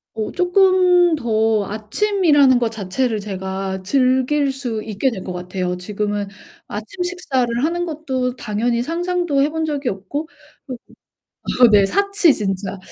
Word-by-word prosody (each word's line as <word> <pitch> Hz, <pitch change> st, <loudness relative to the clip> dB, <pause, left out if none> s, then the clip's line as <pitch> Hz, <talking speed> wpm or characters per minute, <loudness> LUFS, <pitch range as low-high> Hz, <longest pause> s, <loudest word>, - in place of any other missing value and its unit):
어 215 Hz, -1 st, -3 dB
쪼끔 360 Hz, -1 st, +4 dB
더 220 Hz, -5 st, +1 dB
아침이라는 285 Hz, -, +2 dB
거 240 Hz, -2 st, 0 dB
자체를 220 Hz, +2 st, -2 dB
제가 190 Hz, -1 st, -4 dB
즐길 260 Hz, +5 st, +2 dB
수 245 Hz, -5 st, -4 dB
있게 220 Hz, +4 st, -1 dB
될 215 Hz, -, -6 dB
것 185 Hz, -, -5 dB
같아요. 180 Hz, 0 st, -3 dB
지금은 205 Hz, +2 st, -3 dB, 0.4 s
아침 220 Hz, -, -5 dB
식사를 265 Hz, -10 st, -1 dB
하는 345 Hz, +2 st, -1 dB
것도 265 Hz, -6 st, -3 dB
당연히 235 Hz, +2 st, -1 dB
상상도 345 Hz, 0 st, -1 dB
해 290 Hz, -, +1 dB
본 320 Hz, +1 st, -2 dB
적이 290 Hz, -4 st, -2 dB
없고 200 Hz, +11 st, -5 dB, 0.4 s
또 260 Hz, -, -5 dB, 0.9 s
어 -, -, +9 dB
네. 205 Hz, -2 st, +5 dB
사치 400 Hz, -, +3 dB
진짜. 195 Hz, -1 st, -3 dB
250 Hz, 260 characters per minute, -20 LUFS, 210-320 Hz, 0.9 s, 어